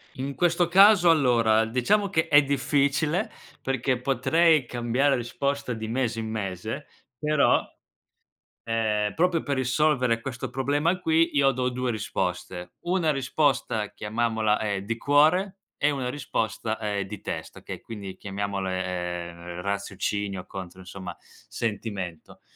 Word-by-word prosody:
In 135 Hz, +2 st, -4 dB
questo 175 Hz, +1 st, +2 dB
caso, 190 Hz, +1 st, +7 dB
allora, 120 Hz, -8 st, +4 dB
diciamo 130 Hz, -, +1 dB
che 160 Hz, -4 st, +1 dB
è 145 Hz, 0 st, +6 dB
difficile, 145 Hz, -, +1 dB, 0.3 s
perché 130 Hz, -1 st, 0 dB
potrei 155 Hz, +2 st, +3 dB
cambiare 120 Hz, +4 st, +1 dB
risposta 140 Hz, +2 st, -2 dB
di 110 Hz, -1 st, -5 dB
mese 120 Hz, 0 st, -1 dB
in 110 Hz, -1 st, -3 dB
mese, 110 Hz, +5 st, -4 dB, 0.3 s
però, 150 Hz, +1 st, +3 dB, 1.0 s
ehm, 110 Hz, -2 st, 0 dB
proprio 170 Hz, -1 st, +2 dB
per 140 Hz, -, 0 dB
risolvere 130 Hz, -2 st, +2 dB
questo 120 Hz, 0 st, -5 dB
problema 145 Hz, +7 st, 0 dB
qui, 165 Hz, -1 st, +3 dB
io 140 Hz, -1 st, +4 dB
do 125 Hz, 0 st, -1 dB
2 125 Hz, 0 st, -2 dB
risposte. 90 Hz, -3 st, -3 dB
Una 175 Hz, -3 st, +1 dB
risposta 135 Hz, -6 st, 0 dB
chiamiamola, 110 Hz, 0 st, 0 dB
ehm, 100 Hz, -2 st, -2 dB
di 115 Hz, +2 st, -2 dB
cuore 160 Hz, -, +3 dB, 0.2 s
e 145 Hz, -, +2 dB
una 135 Hz, -3 st, -2 dB
risposta 115 Hz, -5 st, -2 dB
è 105 Hz, -2 st, -2 dB
di 100 Hz, +1 st, -8 dB
testa, -, -, -6 dB
che -, -, -7 dB
quindi 100 Hz, -4 st, -8 dB
chiamiamole, 95 Hz, -1 st, -3 dB
ehm, 90 Hz, -1 st, -5 dB
raziocinio 100 Hz, 0 st, -3 dB
contro, 95 Hz, -1 st, -8 dB
insomma, 90 Hz, -1 st, -8 dB
sentimento. 100 Hz, -7 st, -6 dB
120 Hz, 130 wpm, -26 LUFS, 105-145 Hz, 1.0 s, caso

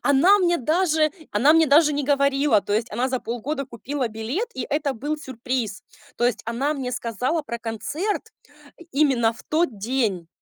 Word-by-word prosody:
она 340 Hz, +9 st, +5 dB
мне 345 Hz, -2 st, +2 dB
даже 315 Hz, +2 st, +2 dB, 0.2 s
она 245 Hz, +9 st, +5 dB
мне 325 Hz, 0 st, +5 dB
даже 300 Hz, +2 st, +5 dB
не 285 Hz, -1 st, -1 dB
говорила. 280 Hz, -4 st, +3 dB
То 205 Hz, -, -4 dB
есть 220 Hz, +2 st, 0 dB
она 245 Hz, +4 st, 0 dB
за 255 Hz, -1 st, -2 dB
полгода 270 Hz, +5 st, -3 dB
купила 255 Hz, +2 st, -4 dB
билет, 225 Hz, -, -3 dB
и 260 Hz, -, -4 dB
это 290 Hz, -1 st, 0 dB
был 295 Hz, +7 st, -3 dB
сюрприз. 255 Hz, -6 st, -4 dB, 0.3 s
То 240 Hz, -, 0 dB
есть 220 Hz, -3 st, -1 dB
она 265 Hz, +6 st, -1 dB
мне 260 Hz, -3 st, -4 dB
сказала 250 Hz, +7 st, -1 dB
про 235 Hz, -5 st, -5 dB
концерт 285 Hz, -, -3 dB, 0.6 s
именно 265 Hz, -6 st, +3 dB
в 230 Hz, -, -14 dB
тот 310 Hz, -9 st, 0 dB
день, 210 Hz, -7 st, -1 dB
265 Hz, 175 wpm, -23 LUFS, 230-300 Hz, 0.6 s, она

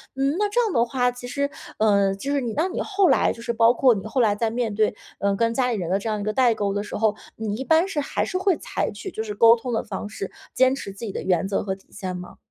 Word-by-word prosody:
嗯， 275 Hz, +2 st, +1 dB
那 415 Hz, -1 st, +2 dB
这 480 Hz, -, +1 dB
样 440 Hz, -5 st, 0 dB
的 235 Hz, -, +4 dB
话， 245 Hz, +1 st, +1 dB
其 245 Hz, 0 st, -9 dB
实， 280 Hz, +3 st, -1 dB, 0.3 s
呃， 200 Hz, -2 st, +3 dB
就 275 Hz, +9 st, -3 dB
是 285 Hz, -, +1 dB
你， 235 Hz, -3 st, -3 dB
那 320 Hz, +5 st, +1 dB
你 380 Hz, -, -3 dB
后 390 Hz, -3 st, +2 dB
来 -, -, +3 dB
就 230 Hz, -, -8 dB
是 235 Hz, -, -1 dB
包 230 Hz, 0 st, +5 dB
括 255 Hz, 0 st, +4 dB
你 195 Hz, -2 st, -5 dB
后 250 Hz, +4 st, 0 dB
来 215 Hz, -3 st, +4 dB
在 225 Hz, +1 st, 0 dB
面 230 Hz, -2 st, -2 dB
对， 215 Hz, 0 st, +1 dB, 0.2 s
呃， 200 Hz, 0 st, +1 dB
跟 230 Hz, +2 st, +1 dB
家 250 Hz, +1 st, +1 dB
里 230 Hz, -, -1 dB
人 175 Hz, -4 st, -3 dB
的 195 Hz, +2 st, +1 dB
这 220 Hz, -, -4 dB
样 215 Hz, -1 st, -1 dB
一 -, -, -3 dB
个 215 Hz, -, 0 dB
代 245 Hz, 0 st, +4 dB
沟 200 Hz, -2 st, -1 dB
的 205 Hz, -, -2 dB
时 210 Hz, -, -7 dB
候， 215 Hz, -1 st, +2 dB, 0.2 s
你 215 Hz, -2 st, -3 dB
一 255 Hz, -, -4 dB
般 320 Hz, +6 st, +3 dB
是 315 Hz, -6 st, -2 dB
还 280 Hz, -, -1 dB
是 370 Hz, -, -2 dB
会 375 Hz, -1 st, +2 dB
采 -, -, -3 dB
取 385 Hz, -, -7 dB
就 220 Hz, -, -4 dB
是 210 Hz, -, -5 dB
沟 230 Hz, +2 st, +7 dB
通 240 Hz, +1 st, -5 dB
的 225 Hz, -, 0 dB
方 -, -, -5 dB
式， 195 Hz, -2 st, -6 dB, 0.2 s
坚 260 Hz, +1 st, +4 dB
持 200 Hz, -, -6 dB
自 195 Hz, -, -14 dB
己 205 Hz, -, -4 dB
的 -, -, -4 dB
原 185 Hz, 0 st, +1 dB
则 195 Hz, -, -1 dB
和 190 Hz, -1 st, -2 dB
底 190 Hz, -, -23 dB
线 185 Hz, -2 st, -5 dB
吗？ 180 Hz, 0 st, -9 dB
230 Hz, 325 characters per minute, -24 LUFS, 205-265 Hz, 0.3 s, 沟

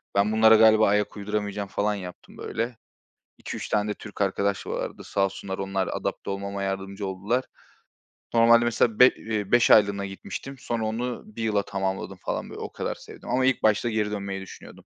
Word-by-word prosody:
ben 100 Hz, +2 st, +3 dB
bunlara 110 Hz, 0 st, +6 dB
galiba 110 Hz, -1 st, +6 dB
ayak 105 Hz, +1 st, 0 dB
uyduramayacağım 105 Hz, 0 st, -3 dB
falan 105 Hz, +1 st, 0 dB
yaptım 90 Hz, -3 st, -10 dB
böyle. 115 Hz, +1 st, -3 dB, 0.6 s
2-3 -, -, -6 dB
tane 105 Hz, 0 st, +1 dB
de -, -, -1 dB
Türk 105 Hz, -1 st, -9 dB
arkadaş 100 Hz, 0 st, 0 dB
vardı. -, -, -4 dB
Sağ 100 Hz, -1 st, +1 dB
olsunlar 95 Hz, 0 st, -5 dB
onlar 95 Hz, -1 st, -1 dB
adapte -, -, -4 dB
olmama 100 Hz, 0 st, -4 dB
yardımcı 95 Hz, +1 st, -3 dB
oldular. 100 Hz, +7 st, -1 dB, 0.9 s
Normalde 115 Hz, 0 st, +6 dB
mesela 115 Hz, -1 st, +1 dB
be 125 Hz, -, +10 dB
eee, 110 Hz, -5 st, -3 dB
5 120 Hz, -1 st, +5 dB
aylığına 100 Hz, -2 st, +5 dB
gitmiştim. 135 Hz, +7 st, -7 dB
Sonra 115 Hz, -3 st, -2 dB
onu 120 Hz, +3 st, -3 dB
1 215 Hz, -, -7 dB
yıla 105 Hz, -2 st, +1 dB
tamamladım 95 Hz, -1 st, -3 dB
falan -, -, -3 dB
böyle, -, -, -8 dB
o -, -, -5 dB
kadar -, -, -3 dB
sevdim -, -, -12 dB
ama 130 Hz, +1 st, +2 dB
ilk 130 Hz, -1 st, +1 dB
başta 110 Hz, +2 st, +3 dB
geri 105 Hz, -2 st, 0 dB
dönmeyi 100 Hz, -2 st, -4 dB
düşünüyordum. 95 Hz, -, -12 dB
105 Hz, 175 wpm, -26 LUFS, 100-110 Hz, 0.9 s, be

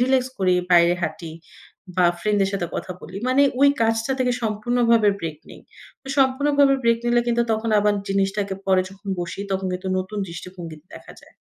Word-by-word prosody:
Relax 255 Hz, 0 st, +2 dB
করি, 185 Hz, -1 st, +2 dB, 0.2 s
বাইরে 175 Hz, 0 st, +5 dB
হাঁটি 165 Hz, -2 st, -4 dB, 0.6 s
বা 180 Hz, -, +4 dB, 0.2 s
ফ্রেন্ড 210 Hz, -1 st, +1 dB
দের 195 Hz, -, +2 dB
সাথে 180 Hz, -3 st, -2 dB
কথা 180 Hz, -, -4 dB
বলি। 180 Hz, +5 st, -10 dB
মানে 270 Hz, +2 st, +4 dB, 0.2 s
ওই 280 Hz, -, +7 dB
কাজটা 225 Hz, +3 st, +1 dB
থেকে 250 Hz, -1 st, +1 dB
সম্পূর্ণভাবে 230 Hz, 0 st, +2 dB
ব্রেক 155 Hz, -2 st, -5 dB
নেই। -, -, -13 dB, 0.6 s
সম্পূর্ণভাবে 275 Hz, +1 st, +3 dB
ব্রেক 230 Hz, 0 st, +3 dB
নিলে 240 Hz, 0 st, +3 dB
কিন্তু 235 Hz, 0 st, +2 dB
তখন 220 Hz, +1 st, -1 dB
আবার 210 Hz, 0 st, +2 dB
জিনিসটাকে 195 Hz, 0 st, -1 dB
পরে 190 Hz, -1 st, +3 dB
যখন 200 Hz, +1 st, -13 dB
বসি 175 Hz, +3 st, -5 dB
তখন 190 Hz, 0 st, -2 dB
কিন্তু 185 Hz, +1 st, -4 dB
নতুন 195 Hz, +3 st, -5 dB
দৃষ্টিভঙ্গিতে 170 Hz, -2 st, -9 dB
দেখা -, -, -12 dB
যায়। -, -, -21 dB
205 Hz, 170 wpm, -22 LUFS, 185-240 Hz, 0.6 s, ওই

